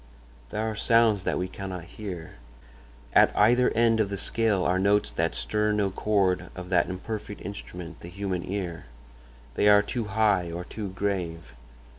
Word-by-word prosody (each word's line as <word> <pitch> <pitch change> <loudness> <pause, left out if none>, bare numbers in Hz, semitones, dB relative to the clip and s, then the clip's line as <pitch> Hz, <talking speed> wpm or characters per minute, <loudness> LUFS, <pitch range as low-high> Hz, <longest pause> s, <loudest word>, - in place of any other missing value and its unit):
"There 110 +1 -2
are 110 - -2
sounds 110 -3 +3
that - - 0
we 90 - -1
cannot 95 -2 -6
hear. 90 - -8 0.8
At - - +6
either 120 +4 +5
end 115 0 +3
of 105 -3 +1
the 100 - -3
scale 105 -1 +1
are 90 +1 +2
notes 100 +2 +2
that - - -1
stir 105 0 0
no 100 -2 +1
chord 95 -2 +1
of 90 0 -7
that 90 - +2
imperfect 105 +3 -5
instrument, 90 -4 -8
the - - -10
human 95 -1 -3
ear. 90 -5 -4 0.7
They 105 - +2
are 105 0 +7
too 115 +1 -3
high 105 -4 +1
or 85 +1 -5
too 105 -1 -6
grave. 90 -4 -3
100 Hz, 165 wpm, -27 LUFS, 90-105 Hz, 0.8 s, are